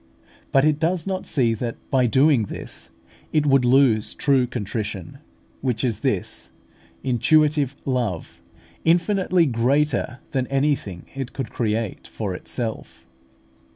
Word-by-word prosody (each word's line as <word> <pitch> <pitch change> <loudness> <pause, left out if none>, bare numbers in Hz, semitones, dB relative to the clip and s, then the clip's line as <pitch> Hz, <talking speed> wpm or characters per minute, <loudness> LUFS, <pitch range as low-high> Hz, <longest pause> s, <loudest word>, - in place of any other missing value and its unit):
But 135 +1 +4
it 155 -1 +2
does 165 +1 0
not 190 -1 -3
see 120 -5 +2
that, 115 +1 -3 0.2
by 130 -2 +3
doing 130 -1 +4
this, - - -8 0.4
it 150 -1 +2
would 135 -2 +4
lose 125 -4 +3
true 135 -3 +2
contrition, 105 -1 -5 0.4
which 125 -5 -1
is 120 -4 0
this - - -2 0.5
intuitive 145 +2 +2
love, 120 - -2 0.4
infinitely 175 +1 +3
greater 130 +1 +1
than 130 -2 -1
anything 135 -10 -1
it 135 -2 -5
could 135 -4 -5
create 110 -2 -2
for 100 -4 -4
itself. 110 +4 -5
130 Hz, 120 wpm, -23 LUFS, 115-150 Hz, 0.5 s, But